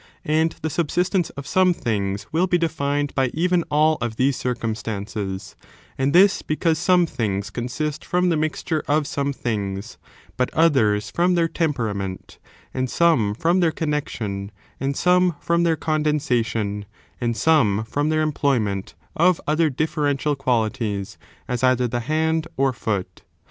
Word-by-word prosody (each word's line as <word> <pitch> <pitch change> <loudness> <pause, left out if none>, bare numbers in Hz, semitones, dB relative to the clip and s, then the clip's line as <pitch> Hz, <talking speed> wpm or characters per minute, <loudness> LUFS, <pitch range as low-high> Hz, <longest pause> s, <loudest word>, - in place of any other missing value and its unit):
And 160 +2 +1
the 160 - 0
subsistence 175 +3 0
of 140 - -6
some 185 +1 +3
things 100 -5 -2
will 170 +4 +2
be 180 - +3
defined 145 -3 -1
by 135 -1 +2
even 175 +1 +2
all 155 +1 +3
of 115 -2 -2
these 130 +3 +2
circumstances; 110 -5 -4 0.4
and 135 +1 0
this 190 +4 +5
because 160 0 0
some 180 0 +4
things 100 -9 -3
consist 145 +5 -3
from 180 0 +1
the 170 - +2
mixture 155 +1 -1
of 150 +1 +2
some 140 0 -1
things, 105 -5 -4 0.4
but 125 0 0
others 115 -11 +3
from 180 +1 +2
their 170 -1 +3
temperament, 110 - -3 0.3
and 130 -1 -1
some 125 -13 +2
from 170 - +2
their 170 -3 +3
connexion, 115 -11 -3 0.3
and 135 +1 -2
some 180 -1 +3
from 170 0 +1
their 170 -1 +3
condensation, 125 -10 0 0.4
and 120 -1 -1
some 110 -11 +3
from 145 +7 -1
their 155 0 +2
employ 140 -3 +1
ment 100 -3 -3 0.2
of 175 +1 +3
other 155 +1 +2
differential 145 0 0
qualities, 115 -6 -1 0.3
as 125 0 -2
either 130 -1 +3
the 120 +1 -2
hand 160 +5 0
or 135 -1 +2
foot. 100 -6 -3
140 Hz, 150 wpm, -22 LUFS, 115-160 Hz, 0.4 s, this